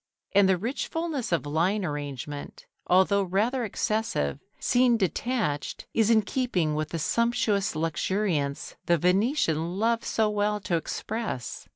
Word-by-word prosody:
And 200 -1 +5
the 190 - +4
rich 230 +9 -3
fullness 320 - -3
of 170 -3 +1
line 180 +7 +1
arrangement, 145 -1 -6 0.2
although 190 +2 +4
rather 210 +7 0
excessive, 210 - -1 0.2
seen 245 -1 +3
detached, 200 - -1
is 225 -1 +3
in 220 -2 +5
keeping 195 - 0
with 155 0 -2
the 165 - -3
sumptuous 210 0 +1
luxuriance 160 -2 -1
the 170 - +4
Venetian 180 - +1
loved 230 +2 +1
so 220 -1 +1
well 210 0 0
to 180 - -1
express. 205 - -4
195 Hz, 135 wpm, -27 LUFS, 160-225 Hz, 0.2 s, And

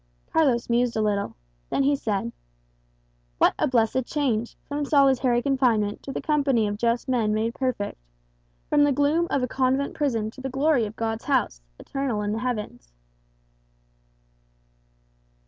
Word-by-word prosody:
Carlos 270 -7 +2
mused 240 0 +1
a - - +1
little. 205 -1 -1 0.3
Then 275 - +1
he 285 +1 +3
said, 200 - -2 1.1
"What - - +4
a - - +2
blessed 250 0 +2
change, 240 -5 -1
from 290 +1 -2
solitary 265 -4 +3
confinement 240 -7 +1
to 275 - -7
the - - -5
company 280 -7 +2
of 205 0 -3
just 235 +2 0
men 225 -5 +1
made 225 +2 -1
perfect; 250 - -3 0.7
from 295 -1 +4
the 290 - +4
gloom 290 +5 +2
of 275 - 0
a - - +1
convent 265 +2 0
prison 230 -8 -1
to 260 - -12
the 265 - -3
glory 270 -3 +2
of 210 - -10
God's 225 0 -3
house, 260 - 0 0.2
eternal 265 -6 -2
in 205 - -1
the 220 - -2
heavens!" 210 - -4
250 Hz, 150 wpm, -25 LUFS, 220-275 Hz, 1.1 s, What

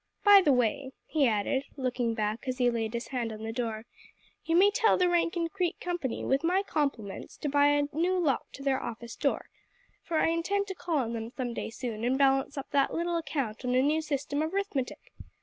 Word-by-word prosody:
By 410 -1 +9
the 300 - +3
way," 260 +2 +1
he 295 -4 +2
added, 225 +5 0
looking 245 -3 -1
back 215 +3 -2
as 255 0 -2
he 245 -2 +3
laid 225 -1 -2
his 235 - -4
hand 245 -4 -2
on 215 0 -8
the 225 - -3
door, 225 -2 -3 0.6
"you 330 - 0
may 395 +4 +6
tell 440 +2 +3
the 365 - +3
Rankin 340 -1 +1
Creek 360 -1 -2
Company, 345 -9 -3
with 270 +3 +1
my 365 +4 +2
compliments, 275 - -3
to 295 - -3
buy 285 +1 +4
a 290 0 +3
new 350 +5 +1
lock 305 -8 0
to 275 - -9
their 270 -1 +1
office 235 0 -6
door, - - -1 0.6
for 330 - -2
I 325 - +3
intend 380 +5 0
to - - -2
call 340 -3 -2
on 235 -4 -1
them 225 0 -4
some 245 -1 -4
day - - -4
soon 225 -2 -5
and 255 +2 +2
balance 270 +1 +2
up 275 - -6
that 280 -2 +2
little 340 +1 -1
account 270 -8 -3
on 250 0 0
a 255 - +5
new 305 +3 +2
system 285 -1 -2
of 315 +3 -2
'rithmetic! 310 -11 -3
275 Hz, 220 wpm, -29 LUFS, 240-330 Hz, 0.6 s, By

